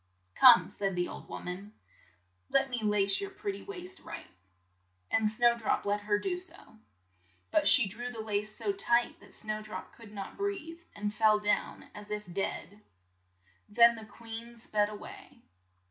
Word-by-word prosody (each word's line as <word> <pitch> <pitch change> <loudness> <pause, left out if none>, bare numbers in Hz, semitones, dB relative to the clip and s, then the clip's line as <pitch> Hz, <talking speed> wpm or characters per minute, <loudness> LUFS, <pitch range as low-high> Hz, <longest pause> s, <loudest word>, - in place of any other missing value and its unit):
"Come," - - +7
said 195 -2 -2
the 175 0 0
old - - -9
wom - - -7
an, 195 +4 -6 0.8
"let 270 -1 +2
me 240 -2 -2
lace 210 - +1
your 400 - -4
pret 400 +1 -4
ty - - -9
waist 375 -2 -6
right," - - -8 0.9
and 220 -1 +3
Snow 235 +2 +4
drop 230 -3 -1
let 205 +1 +1
her 205 0 +1
do 360 - -2
so. 370 +1 -8 0.9
But - - +3
she 255 -7 +8
drew 240 +5 -6
the 230 - -7
lace 210 0 -2
so 405 - -1
tight 240 -11 +2
that - - -15
Snow 215 -1 -3
drop 215 0 -8
could 225 -3 -14
not 200 -2 -7
breathe, 380 -5 -4
and 205 0 -3
fell 215 -1 +4
down 210 0 -1
as 210 0 -11
if 210 0 -3
dead. 200 +1 -4 0.9
Then 235 +2 +7
the 220 -1 -9
queen 230 +1 -8
sped 210 -2 0
a 210 - -7
way. 375 - -12
220 Hz, 175 wpm, -31 LUFS, 210-270 Hz, 0.9 s, she